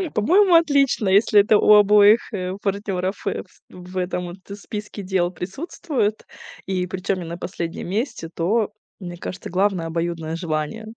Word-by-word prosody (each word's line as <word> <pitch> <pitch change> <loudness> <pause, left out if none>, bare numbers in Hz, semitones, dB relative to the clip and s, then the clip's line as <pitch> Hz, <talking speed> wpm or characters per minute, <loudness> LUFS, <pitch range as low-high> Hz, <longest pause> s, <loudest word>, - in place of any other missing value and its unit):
По-моему, 360 - +4
отлично, 280 - +3
если 205 +1 +5
это 210 +1 +4
у 210 - +5
обоих, 210 +2 +5
э, 185 -2 -3
партнеров, 195 -1 -3
э, - - -2
фс 185 - -27
в 180 +1 -10
этом 180 -1 -2
вот, 175 +2 -9
э, 200 - -6
списке 210 0 -7
дел 185 -2 0
присутствует, 215 - -3 0.4
и 185 -1 -2
причем 185 +1 -2
не 170 - -6
на 170 +1 -6
последнем 170 -1 -5
месте, 200 - -3
то, 210 +5 0 0.3
мне 175 -1 -7
кажется, 185 - -7
главное- 185 -2 0
обоюдное 165 -1 -3
желание. 165 +6 -3
190 Hz, 160 wpm, -22 LUFS, 180-210 Hz, 0.4 s, если